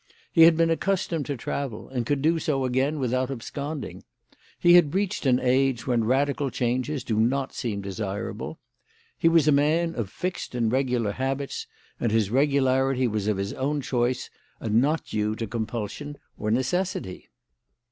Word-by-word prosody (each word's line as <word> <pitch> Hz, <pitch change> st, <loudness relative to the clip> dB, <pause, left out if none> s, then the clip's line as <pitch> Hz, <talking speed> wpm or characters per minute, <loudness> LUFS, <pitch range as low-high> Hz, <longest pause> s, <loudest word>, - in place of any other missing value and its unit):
He 165 Hz, -1 st, +7 dB
had 165 Hz, -1 st, +6 dB
been 165 Hz, 0 st, +3 dB
accustomed 170 Hz, -3 st, -1 dB
to 140 Hz, -3 st, -3 dB
travel, 120 Hz, -1 st, -4 dB
and 125 Hz, -3 st, -3 dB
could 145 Hz, -1 st, 0 dB
do 165 Hz, +1 st, +3 dB
so 135 Hz, -4 st, 0 dB
again 130 Hz, +4 st, +1 dB
without 130 Hz, -1 st, 0 dB
absconding. 140 Hz, +3 st, -5 dB, 0.5 s
He 175 Hz, -, +5 dB
had 175 Hz, -2 st, +5 dB
reached 195 Hz, -7 st, 0 dB
an 125 Hz, -1 st, +4 dB
age 130 Hz, -1 st, +1 dB
when 120 Hz, -3 st, +1 dB
radical 140 Hz, +3 st, +1 dB
changes 130 Hz, +4 st, -1 dB
do 110 Hz, -2 st, -1 dB
not 130 Hz, +4 st, +1 dB
seem 105 Hz, -5 st, -3 dB
desirable. 100 Hz, +2 st, -4 dB, 0.6 s
He 165 Hz, -, +4 dB
was 165 Hz, -3 st, +4 dB
a -, -, +6 dB
man 155 Hz, +4 st, +2 dB
of 115 Hz, -6 st, -3 dB
fixed 180 Hz, -, -4 dB
and 115 Hz, -2 st, +1 dB
regular 125 Hz, -4 st, +1 dB
habits, 135 Hz, +4 st, -3 dB, 0.3 s
and 115 Hz, -, 0 dB
his 110 Hz, -2 st, +1 dB
regularity 135 Hz, -1 st, +2 dB
was 105 Hz, -2 st, -2 dB
of 105 Hz, -2 st, +1 dB
his 100 Hz, +1 st, -3 dB
own 145 Hz, +3 st, -1 dB
choice 125 Hz, -1 st, -1 dB, 0.3 s
and 110 Hz, +1 st, +2 dB
not 150 Hz, +4 st, 0 dB
due 105 Hz, 0 st, -1 dB
to 115 Hz, -, -3 dB
compulsion 115 Hz, +6 st, -4 dB, 0.2 s
or 105 Hz, -, -3 dB
necessity. 130 Hz, -, -1 dB
130 Hz, 165 wpm, -26 LUFS, 115-145 Hz, 0.6 s, He